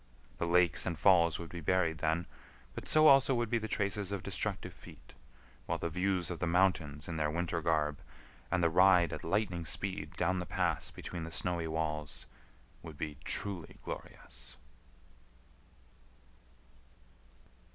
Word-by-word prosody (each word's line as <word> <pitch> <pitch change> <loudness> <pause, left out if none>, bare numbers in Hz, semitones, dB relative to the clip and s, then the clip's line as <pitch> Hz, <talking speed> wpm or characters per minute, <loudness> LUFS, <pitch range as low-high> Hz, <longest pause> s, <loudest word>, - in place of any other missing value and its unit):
The 85 - 0
lakes 85 -2 +3
and 85 -3 -2
falls 85 -2 +5
would 85 -2 -8
be 85 - -6
buried 80 -1 +1
then; 80 +2 0 0.5
but - - -7
so, 155 0 +5
also, 135 -2 +6
would 120 -2 -1
be 120 - +2
the 110 - -4
traces 100 -2 -1
of 100 -3 -3
destructive - - -2
feet, - - -15 0.5
while - - 0
the 85 - -3
views 90 0 0
of 85 - -5
the 90 - -1
mountains 85 -5 +1
in 85 -1 -4
their 75 -1 +1
winter 85 +1 -2
garb, 75 -2 +1 0.5
and 90 - +1
the 85 - +4
ride 90 -1 +5
at - - -6
lightning 90 -1 -1
speed 80 -2 -3
down 90 +1 +1
the 90 - -5
pass - - -1
between 85 - -7
the 80 0 -6
snowy 85 -1 0
walls, 75 -2 -3 0.6
would 80 -3 -10
be 75 -2 -5
truly 95 -5 0
glorious. - - -8
85 Hz, 150 wpm, -33 LUFS, 80-95 Hz, 0.6 s, also